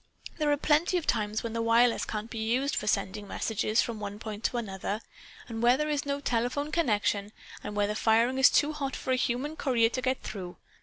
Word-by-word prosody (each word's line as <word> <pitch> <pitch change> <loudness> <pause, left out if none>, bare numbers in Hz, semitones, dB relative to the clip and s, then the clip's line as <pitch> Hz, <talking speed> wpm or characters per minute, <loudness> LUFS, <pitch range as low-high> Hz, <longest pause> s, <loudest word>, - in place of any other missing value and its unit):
There 300 -1 +2
are 290 - +3
plenty 310 +5 +2
of 335 - -3
times 215 -1 0
when 230 -1 -4
the 230 - -1
wireless 230 +1 +3
can't 215 +1 -5
be 225 - -5
used 245 +6 0
for 210 - -2
sending 200 0 -1
messages 220 +1 0
from 230 -2 -5
one 205 0 -5
point 215 0 -7
to 245 - 0
another, 200 -2 -3 0.5
and 225 -1 -5
where 240 +2 +5
there 300 +1 -1
is 290 -1 -1
no 280 0 -1
telephone 255 +3 -1
connection, 210 -9 +1 0.3
and 210 - -5
where 205 0 +2
the 210 - -1
firing 230 +4 +2
is 265 - +8
too 300 +1 +2
hot 275 -3 -3
for 260 - -3
a - - +4
human 255 +4 -1
courier 240 -6 +2
to 255 - -3
get 260 +1 -1
through. 185 -4 -7
230 Hz, 220 wpm, -29 LUFS, 215-270 Hz, 0.5 s, is